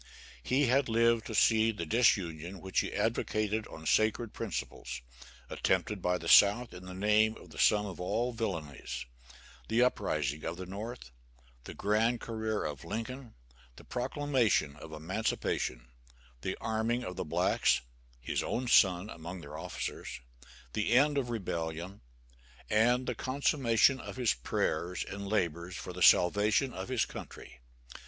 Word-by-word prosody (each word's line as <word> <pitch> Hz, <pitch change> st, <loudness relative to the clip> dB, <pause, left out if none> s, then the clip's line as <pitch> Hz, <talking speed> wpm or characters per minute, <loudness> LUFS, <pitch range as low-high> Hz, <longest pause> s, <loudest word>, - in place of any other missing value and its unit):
He 130 Hz, -, +2 dB
had 130 Hz, +1 st, +2 dB
lived 115 Hz, 0 st, +3 dB
to 110 Hz, -, -4 dB
see 110 Hz, +1 st, +4 dB
the 95 Hz, -6 st, -5 dB
disunion 90 Hz, -4 st, +1 dB
which 95 Hz, +2 st, -1 dB
he -, -, -2 dB
advocated 110 Hz, +1 st, -1 dB
on 80 Hz, -, -11 dB
sacred 110 Hz, +5 st, +2 dB
principles, 105 Hz, -, -5 dB, 0.5 s
attempted 95 Hz, -, 0 dB
by 90 Hz, 0 st, +1 dB
the 85 Hz, -, -7 dB
South 105 Hz, +7 st, +6 dB
in 90 Hz, +1 st, -10 dB
the 90 Hz, 0 st, -8 dB
name 105 Hz, +3 st, +3 dB
of -, -, -15 dB
the -, -, -10 dB
sum 105 Hz, -1 st, +4 dB
of 95 Hz, -3 st, -7 dB
all 120 Hz, +7 st, -1 dB
villanies; 75 Hz, -, -4 dB, 0.6 s
the 115 Hz, +2 st, +3 dB
uprising 75 Hz, -, 0 dB
of 85 Hz, +1 st, -4 dB
the 95 Hz, -, -6 dB
North; 100 Hz, -, -7 dB, 0.5 s
the -, -, -8 dB
grand 110 Hz, +4 st, +1 dB
career 110 Hz, -2 st, -3 dB
of 75 Hz, -3 st, -5 dB
Lincoln; 115 Hz, +2 st, -6 dB, 0.4 s
the -, -, -13 dB
proclamation 125 Hz, -, 0 dB
of 80 Hz, +1 st, -10 dB
emancipation; 80 Hz, -, -2 dB, 0.5 s
the 95 Hz, -, -3 dB
arming 115 Hz, +2 st, -1 dB
of 90 Hz, -4 st, -5 dB
the 95 Hz, -, -3 dB
blacks 75 Hz, -, +2 dB, 0.4 s
his -, -, -2 dB
own 125 Hz, +1 st, -2 dB
son 95 Hz, -4 st, +5 dB
among 85 Hz, -1 st, -8 dB
their -, -, -9 dB
officers; -, -, -5 dB, 0.5 s
the 105 Hz, +2 st, 0 dB
end 145 Hz, +4 st, +5 dB
of 130 Hz, -, -2 dB
the 120 Hz, -, -3 dB
rebellion; 85 Hz, -2 st, -4 dB, 0.7 s
and 120 Hz, +4 st, +3 dB
the 125 Hz, -, -1 dB
consummation 130 Hz, -1 st, +2 dB
of -, -, -8 dB
his 125 Hz, -3 st, +2 dB
prayers 80 Hz, +8 st, -2 dB
and 100 Hz, 0 st, -7 dB
labors 90 Hz, -3 st, -1 dB
for 90 Hz, -, -7 dB
the 90 Hz, -, -8 dB
salvation 105 Hz, -, +4 dB
of 95 Hz, +4 st, -6 dB
his 130 Hz, -3 st, +1 dB
country. -, -, -10 dB
105 Hz, 150 wpm, -31 LUFS, 90-115 Hz, 0.7 s, South